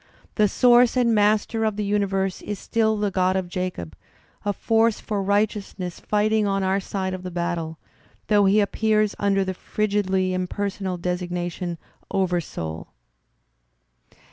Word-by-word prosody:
The 210 -1 +3
source 245 +3 +5
and 240 -2 +3
master 215 +1 +2
of 215 -2 0
the 210 - -2
universe 195 -2 0
is 205 -1 -4
still 220 +1 +1
the 205 -1 0
Grod 185 0 +1
of 190 -1 -1
Jacob, 180 - -4 0.5
a 205 - +1
force 225 +2 +2
for 210 -3 -2
righteousness 200 -2 -1
fighting 215 0 +1
on 195 -1 0
our 190 +1 +1
side 190 -1 -3
of 185 - -5
the 185 - -5
battle, 170 -2 -3 0.5
though 205 -2 +4
he 200 +2 +4
appears 215 0 +1
under 195 -1 +2
the 190 - -2
frigidly 190 -2 0
impersonal 190 0 -2
designation: 175 0 -3 0.3
"Oversoul." 165 - -2
195 Hz, 140 wpm, -24 LUFS, 185-210 Hz, 0.5 s, source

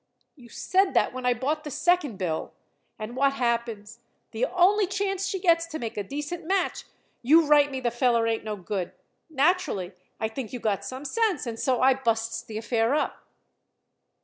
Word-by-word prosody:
You 245 -5 -16
said 380 +8 +1
that - - +3
when 255 -1 -3
I 245 - +3
bought 295 +6 -2
the 300 - -6
second 300 - +1
bill. 170 -5 -3 0.4
And 215 +3 -6
what 275 +1 +3
happens? 235 -3 -2 0.3
The - - 0
only 385 0 +3
chance 390 0 -1
she 385 - -2
gets 335 -2 +3
to 320 -1 -5
make 230 -6 -5
a 205 - -2
decent 295 - -5
match, 380 +4 -1 0.4
you 315 +6 +5
write 290 -1 +5
me 265 -2 -4
the 240 -1 0
feller 240 -1 +2
ain't 225 -1 -1
no 215 -1 -3
good. 185 -1 -4 0.4
Naturally, 295 - +1 0.3
I 220 - 0
think 225 +1 -6
you 250 - -4
got 210 -4 -1
some 260 +3 -7
sense, 430 +1 0
and 230 -2 -5
so 260 -3 +1
I 265 +1 +6
busts 230 -3 -1
the 215 - -8
affair 230 +3 +1
up." 305 - -2
260 Hz, 185 wpm, -26 LUFS, 230-335 Hz, 0.4 s, I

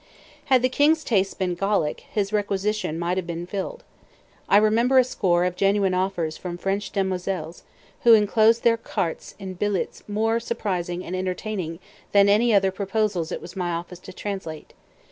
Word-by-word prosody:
Had 260 -4 +3
the - - +5
king's 300 +5 +3
tastes 195 -4 +1
been 185 -2 -1
Gallic, 195 -4 0
his 205 -1 -1
requisition 205 -4 -1
might 175 +2 -1
have 185 -2 -2
been 170 0 -4
filled. 200 - -5 0.7
I 200 - +6
remember 230 +5 +3
a 255 - +8
score 180 -8 +1
of 180 0 -1
genuine 195 0 +2
offers 180 -4 -1
from 175 -1 -6
French 195 +3 -2
demoiselles, 185 -4 -3 0.4
who 235 -1 +8
enclosed 220 +2 +3
their 230 -1 +4
cartes 175 -6 -4
in 190 -2 -7
billets 200 +1 -2
more 220 +2 +1
surprising 185 -7 -3
and 185 - -4
enterprising 185 -2 -3 0.4
than 200 0 +6
any 225 +4 +4
other 195 -2 +4
"proposals" 195 -3 -1
it - - -5
was 180 - -10
my 180 -2 -2
office 175 +1 -5
to 185 - -11
translate. 185 -5 -6
195 Hz, 165 wpm, -24 LUFS, 180-215 Hz, 0.7 s, a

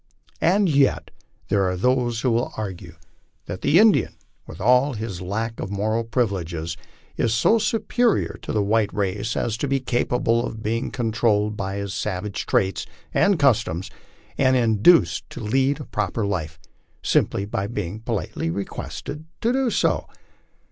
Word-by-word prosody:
And 195 +4 +3
yet 140 -4 +2 0.4
there 100 -2 +2
are 90 - -2
those 120 +1 +1
who 120 -3 +2 0.2
argue 95 -5 -6 0.5
that 90 +2 -6
the 155 - +4
Indian* 215 +1 +4 0.3
with - - -10
all 125 +6 +4
his 105 -5 -5
lack 110 +5 -3
of 95 - -4
moral 110 +3 0
privileges, 90 -9 -2 0.4
is 115 -1 +1
so 220 - +4
superior 225 +2 +1
to - - -5
the 105 -2 +1
white 105 +1 +1
race 100 +2 -1
as 115 -1 -1
to 145 - -2
bo 135 0 +1
capable 120 -1 +1
of 110 -2 -6
being 115 +3 -1
controlled 110 -3 0
in 95 0 -3
his 100 -1 -4
savage 95 +3 -3
traits 95 0 +1 0.3
and 200 -2 +3
customs, 115 - +1 0.5
and 130 -1 +4
induced 120 - +4
to - - -8
lead 130 +6 +1
a 145 - -7
proper 105 +1 -2
life, 85 -5 -3 0.4
simply 100 - +1
by 100 -1 -2
being 105 -2 -4
politely 95 -6 -3
requested 140 - -5 0.2
to 235 +2 +2
do 265 -1 +1
so. - - +1
110 Hz, 150 wpm, -23 LUFS, 100-130 Hz, 0.5 s, the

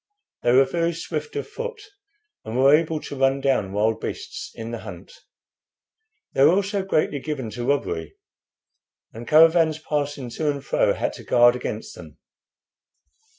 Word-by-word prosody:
They 120 - +2
were 135 +2 +6
very 170 +4 -1
swift 155 -2 -5
of 140 - -3
foot, 475 -1 -6 0.6
and 110 +2 -5
were 135 +3 +6
able 160 0 0
to - - -7
run 135 0 +2
down 130 -8 0
wild 110 +2 0
beasts - - -6
in 115 0 -6
the 115 - -5
hunt. - - -10 1.2
They 135 - +3
were 155 +4 +6
also 200 0 0
greatly 155 -6 0
given 130 -5 -5
to 120 +2 -5
robbery, 85 - -1 1.0
and 115 +2 -9
caravans 160 0 +5
passing 145 -5 -3
to 150 +5 -1
and 140 -1 -3
fro - - +2
had - - -2
to - - -11
guard 120 0 +5
against 125 - -5
them. - - -13
140 Hz, 155 wpm, -23 LUFS, 120-160 Hz, 1.2 s, were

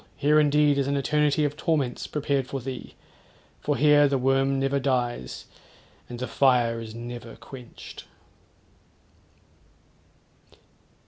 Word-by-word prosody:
here 150 +2 +3
indeed 150 -1 +3
is 135 - 0
an 140 0 0
eternity 150 +1 +2
of 145 0 -2
torments 145 -5 -1
prepared 140 -3 -1
for 135 +1 -4
thee; 130 0 -7 0.6
for - - -1
here 145 0 +5
the 140 -1 +1
worm 135 +1 +1
never 135 +1 +1
dies, 125 - -2 0.6
and 120 - -6
the 125 +1 -4
fire 120 -3 +2
is 110 -1 -8
never 120 0 -8
quenched.' 125 -3 -11
135 Hz, 120 wpm, -26 LUFS, 125-145 Hz, 0.6 s, here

